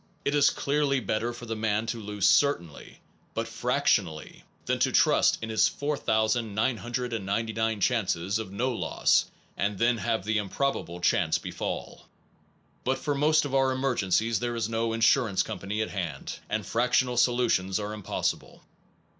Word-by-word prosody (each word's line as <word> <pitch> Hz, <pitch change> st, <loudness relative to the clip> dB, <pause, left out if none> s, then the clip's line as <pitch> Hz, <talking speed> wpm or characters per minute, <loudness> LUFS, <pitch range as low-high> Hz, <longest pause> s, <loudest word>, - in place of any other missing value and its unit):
It 140 Hz, -, +1 dB
is 145 Hz, -1 st, +5 dB
clearly 140 Hz, -1 st, 0 dB
better 115 Hz, 0 st, -1 dB
for 120 Hz, 0 st, -9 dB
the 115 Hz, -1 st, -4 dB
man 110 Hz, 0 st, 0 dB
to 115 Hz, 0 st, -4 dB
lose 105 Hz, -1 st, 0 dB
certainly, 85 Hz, -, +1 dB, 0.3 s
but -, -, -2 dB
fractionally, 80 Hz, -2 st, -1 dB, 0.2 s
than -, -, 0 dB
to -, -, +2 dB
trust -, -, +4 dB
to -, -, -3 dB
his 110 Hz, -1 st, +3 dB
4999 115 Hz, -3 st, -1 dB
chances 100 Hz, -4 st, 0 dB
of 110 Hz, -4 st, -6 dB
no 125 Hz, +6 st, -1 dB
loss, 120 Hz, -, +2 dB, 0.3 s
and 100 Hz, 0 st, -1 dB
then 120 Hz, +1 st, +2 dB
have 110 Hz, +1 st, -1 dB
the 110 Hz, 0 st, +1 dB
improbable 100 Hz, -5 st, -2 dB
chance 90 Hz, -5 st, +2 dB
befall. -, -, -6 dB, 0.8 s
But 130 Hz, +1 st, 0 dB
for 145 Hz, +2 st, -2 dB
most 150 Hz, +2 st, +3 dB
of 140 Hz, -, -5 dB
our 135 Hz, -1 st, +3 dB
emergencies 115 Hz, -4 st, +1 dB
there 120 Hz, 0 st, -2 dB
is 115 Hz, -2 st, -1 dB
no 115 Hz, 0 st, -1 dB
insur 115 Hz, +2 st, +3 dB
ance 95 Hz, -, +1 dB
company 105 Hz, 0 st, -3 dB
at -, -, -6 dB
hand, 85 Hz, -8 st, -5 dB
and -, -, -2 dB
fractional 125 Hz, +1 st, +1 dB
solutions 120 Hz, -6 st, +2 dB
are 105 Hz, 0 st, -4 dB
impossible. 105 Hz, -3 st, -3 dB
115 Hz, 150 wpm, -27 LUFS, 105-125 Hz, 0.8 s, is